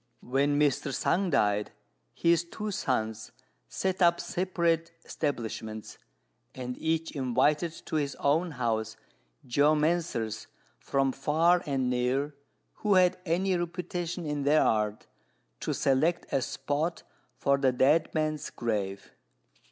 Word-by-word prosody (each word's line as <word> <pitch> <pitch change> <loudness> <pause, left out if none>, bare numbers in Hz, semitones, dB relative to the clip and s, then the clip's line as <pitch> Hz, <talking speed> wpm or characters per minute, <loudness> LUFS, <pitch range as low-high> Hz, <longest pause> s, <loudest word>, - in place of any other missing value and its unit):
When 140 +3 +1
Mr. 145 -1 +1
Sung 185 +7 +1
died, 105 -6 +1 0.4
his 170 0 +3
two 210 +5 -5
sons 110 - -2 0.4
set 190 0 -2
up 170 -1 +5
separate 170 -2 0
establishments, 110 -6 -4 0.6
and 125 -1 -5
each 160 0 -1
invited 145 +5 +1
to 155 - -1
his 140 -2 -1
own 160 +5 +1
house 110 -3 -2 0.5
geomancers 145 -5 +1 0.3
from 135 -1 +1
far 165 +6 +3
and 135 -3 0
near, 130 +4 0 0.4
who 210 -2 +2
had 180 -1 +4
any 185 +3 +1
reputation 175 0 -3
in 150 -1 -2
their 145 +2 +4
art, 105 -1 0 0.5
to - - -2
select 155 +6 +1
a 135 - +2
spot 155 +6 -2 0.3
for 140 0 +2
the 135 -2 +3
dead 150 +6 +3
man's 155 -1 -1
grave. 100 -4 -3
145 Hz, 120 wpm, -29 LUFS, 125-170 Hz, 0.6 s, up